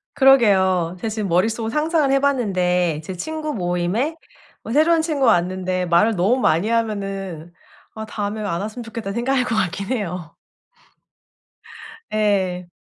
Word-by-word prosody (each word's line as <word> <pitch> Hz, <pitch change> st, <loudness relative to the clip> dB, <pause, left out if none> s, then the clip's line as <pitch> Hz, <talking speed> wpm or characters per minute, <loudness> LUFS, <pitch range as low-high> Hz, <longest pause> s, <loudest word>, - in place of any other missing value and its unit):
그러게요. 190 Hz, -10 st, +4 dB
제가 225 Hz, -, -3 dB
지금 215 Hz, -2 st, -3 dB
머릿속으로 220 Hz, +6 st, +1 dB
상상을 305 Hz, -2 st, +1 dB
해 275 Hz, -, +4 dB
봤는데 180 Hz, -, +1 dB
제 185 Hz, -, -6 dB
친구 310 Hz, -, -4 dB
모임에 180 Hz, -, -1 dB, 0.5 s
어 225 Hz, -, -6 dB
새로운 320 Hz, +4 st, +4 dB
친구가 285 Hz, -7 st, +2 dB
왔는데 185 Hz, +1 st, 0 dB
말을 175 Hz, +6 st, +3 dB
너무 200 Hz, +8 st, +2 dB
많이 175 Hz, -3 st, +2 dB
하면은 195 Hz, -7 st, -3 dB, 0.4 s
'아 220 Hz, 0 st, -5 dB
다음에 210 Hz, 0 st, -4 dB
안 185 Hz, -4 st, -2 dB
왔으면 215 Hz, +4 st, -6 dB
좋겠다.' 225 Hz, -3 st, -6 dB
생각할 250 Hz, +2 st, 0 dB
것 225 Hz, -, -1 dB
같긴 195 Hz, -1 st, -1 dB
해요. 180 Hz, -9 st, -4 dB, 1.8 s
예. 190 Hz, -4 st, 0 dB
210 Hz, 305 characters per minute, -21 LUFS, 180-245 Hz, 1.8 s, 그러게요